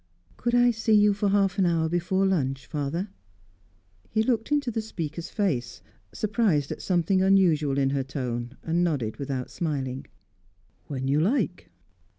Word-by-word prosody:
"Could 240 0 -1
I 245 0 +5
see 220 -1 +2
you 210 0 +5
for 200 0 0
half 195 -1 +2
an 185 - +4
hour 165 -1 +1
before 175 +3 0
lunch, 135 -8 0
father?" 155 - -3 1.0
He 220 0 +1
looked 225 +1 0
into 285 -4 +1
the 225 - -2
speaker's 170 -5 -5
face, 130 - -2 0.3
surprised 205 - 0
at - - -5
something 185 +1 +1
unusual 170 -8 +3
in 135 -1 +2
her 135 -1 0
tone, 125 -2 -4
and 170 +2 +1
nodded 135 -11 -1
without 135 -3 -4
smiling. 135 -5 -3 0.8
"When 130 -2 -3
you 140 +2 +2
like." 200 - 0
170 Hz, 155 wpm, -26 LUFS, 140-205 Hz, 1.0 s, I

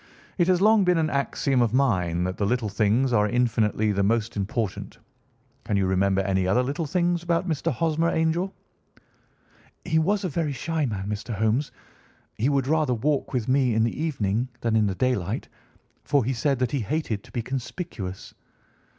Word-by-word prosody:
"It 175 - +4
has 185 -1 +3
long 215 0 +5
been 180 -1 +3
an 155 -1 +1
axiom 140 -1 0
of 120 0 +1
mine 90 -10 +1
that 90 +1 -2
the 100 - 0
little 120 -1 0
things 110 +6 +1
are 105 -2 +3
infinitely 110 -3 +1
the 100 -1 0
most 115 +3 0
important. 105 0 -3 0.7
Can 105 -3 -1
you 95 - +2
remember 95 +1 +2
any 95 -1 0
other 120 +7 +3
little 145 +5 -2
things 175 +1 +1
about 175 +2 0
Mr. 165 0 -1
Hosmer 165 +4 +1
Angel?" 165 +4 0 1.3
"He 160 -2 +2
was 200 +6 +1
a - - 0
very 150 -1 -1
shy 160 +1 -1
man, 100 -4 -4
Mr. 105 +2 -4
Holmes. 110 +7 0 0.6
He 120 +6 0
would 140 -2 +1
rather 150 -3 +1
walk 140 +5 -1
with 125 -4 -2
me 130 -3 +2
in 110 - +3
the 115 +5 -2
evening 120 -6 -1
than 115 -1 0
in 110 -2 +3
the 95 - -2
daylight, 110 -4 -1 0.6
for 140 -5 +2
he 130 - 0
said 135 +3 0
that 125 -1 -1
he 140 - 0
hated 115 -3 -2
to - - -17
be 120 - -3
conspicuous. 130 - -6
125 Hz, 185 wpm, -25 LUFS, 105-155 Hz, 1.3 s, long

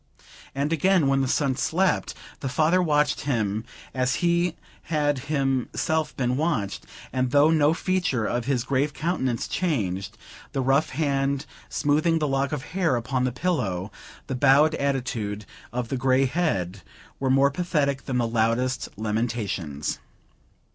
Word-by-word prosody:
And 145 +4 0
again, 180 +1 +3
when 135 0 +3
the 135 - 0
son 135 0 +1
slept, 185 +8 0 0.2
the 135 - -3
father 160 +7 +3
watched 150 -3 +2
him, 110 -6 -1 0.3
as 130 0 +1
he 170 0 +2 0.3
had 145 -3 +1
himself 150 +2 0
been 125 -1 0
watched; 140 -11 -1 0.3
and 130 -1 +1
though 145 +4 +5
no 155 0 +4
feature 180 - 0
of 120 +1 -1
his 130 -3 0
grave 140 +2 0
countenance 130 -8 -1
changed, 100 - -2 0.4
the 135 - 0
rough 135 +4 +2
hand, 140 -1 0 0.2
smoothing 155 +3 +2
the 150 -2 0
lock 135 +1 0
of 150 -3 -3
hair 180 -8 +2
upon 125 +2 -1
the 130 - 0
pillow, 115 - -1 0.3
the - - -4
bowed 140 +4 +5
attitude 120 -8 -2 0.3
of 120 -1 -3
the 135 - -1
grey 130 +1 +3
head, 100 - -1 0.4
were 135 - 0
more 135 +1 +4
pathetic 140 -4 -1
than 130 -2 0
the 120 -1 +1
loudest 115 +3 0
lamentations. 105 -9 -2
135 Hz, 145 wpm, -25 LUFS, 120-155 Hz, 0.4 s, though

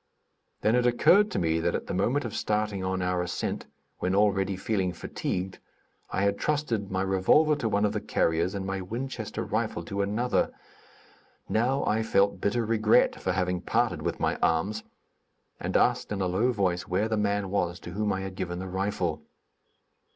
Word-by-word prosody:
Then 110 - +3
it 125 0 +3
occurred 185 - +5
to - - -3
me 80 -2 +1
that 85 +1 0
at - - -3
the - - -4
moment 120 +9 +1
of 115 - -4
starting 105 -2 -1
on 95 0 -1
our 90 0 0
ascent, 90 0 -3 0.3
when 95 +1 0
already 100 -1 +2
feeling 95 -2 -1
fatigued, 90 +1 -4 0.5
I - - -1
had 100 0 +3
entrusted 130 -10 -1
my 95 0 -1
revolver 95 +12 +4
to 115 -6 -1
one 105 0 +2
of 105 - 0
the - - -2
carriers, 85 +4 0
and 95 -1 -3
my 95 0 -2
Winchester 120 +8 -4
rifle - - -2
to 100 0 -3
another. 105 +5 0 1.0
Now 125 +5 +1
I 110 +1 +1
felt 100 -2 +2
bitter 115 +3 +1
regret 110 0 +3
for 95 - 0
having 90 -1 0
parted - - 0
with - - -2
my - - 0
arms, 95 +7 +1 0.8
and - - 0
asked - - +2
in 105 - -2
a 95 - +1
low 100 +8 +2
voice 95 -5 0
where 95 +5 +1
the 110 - 0
man 100 -2 0
was 90 -3 -1
to 85 - -8
whom 105 +2 -1
I 95 -1 -1
had 95 0 -5
given 90 -2 -4
the 95 - -5
rifle. 95 -3 -2
100 Hz, 185 wpm, -28 LUFS, 95-110 Hz, 1.0 s, occurred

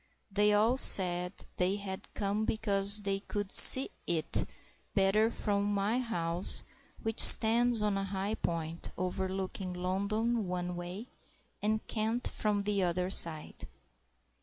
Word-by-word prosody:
They 205 +1 0
all 220 +5 0
said 180 -6 +4 0.3
they 185 +2 -2
had 195 -2 -10
come 205 +1 -4
because 205 -1 +1
they 195 0 -4
could 205 0 -8
see 265 - +10 0.2
"it" 165 -2 -3 0.5
better 205 +3 0
from 205 -2 -4
my 205 +4 -3
house, 175 -7 -3 0.4
which 225 -1 -6
stands 230 0 +5
on 205 -2 -3
a - - -6
high 195 +2 -6
point, 165 -4 -6
overlooking 190 0 -7
London 200 +5 -5
one 180 0 -7
way, 175 +5 -10 0.6
and 215 +1 -4
Kent 225 +2 -4
from 205 -2 -4
the 200 -1 -3
other 180 +1 -4
side. 155 - 0
200 Hz, 130 wpm, -28 LUFS, 180-215 Hz, 0.6 s, see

